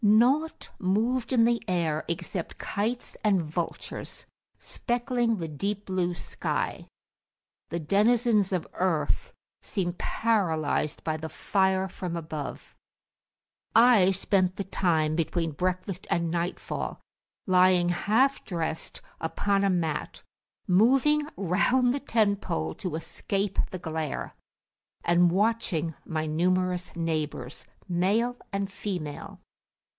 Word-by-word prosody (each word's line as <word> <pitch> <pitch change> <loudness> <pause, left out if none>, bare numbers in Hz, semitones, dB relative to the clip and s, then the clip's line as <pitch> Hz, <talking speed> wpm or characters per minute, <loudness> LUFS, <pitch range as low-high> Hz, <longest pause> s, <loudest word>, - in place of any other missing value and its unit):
Nought 250 +10 +3
moved 230 +7 +1
in 240 -3 +5
the 235 0 +3
air 165 -4 0
except 170 0 -4
kites 230 +5 -3
and 205 -3 +4
vultures, 165 +1 -5 0.3
speckling 240 -1 -1
the 165 -3 -3
deep 200 +7 -3
blue 180 -2 -1
sky: - - -3 0.8
the 170 - -2
denizens 210 - +3
of 180 -3 0
earth 185 - 0 0.3
seemed 175 -3 -3
paralysed 160 -9 0
by 155 -1 -1
the 160 0 -6
fire 190 0 +1
from 180 -2 -5
above. 155 -3 -6 1.0
I 225 -5 +7
spent 190 -1 +1
the 200 - -3
time 160 -5 +1
between 165 0 0
breakfast 185 +3 -2
and 170 -4 +1
nightfall 175 +1 -3 0.5
lying 185 -2 +5
half 225 +10 +2
dressed 165 -4 -4 0.2
upon 200 +4 0
a 200 - +3
mat, 165 -5 -2 0.4
moving 270 +10 +4
round 245 +7 +2
the 285 - -1
tent 215 -7 +1
pole 80 0 -2
to 180 -4 -4
escape 195 +4 -2
the 185 - -5
glare, 160 -3 -3 0.7
and 175 0 +5
watching 190 -5 +1
my 155 -1 -2
numerous 180 +3 0
neighbours, 155 -6 -3 0.2
male 200 +7 +1 0.2
and 195 -1 -2
female. 175 -8 -5
185 Hz, 110 wpm, -27 LUFS, 165-215 Hz, 1.0 s, I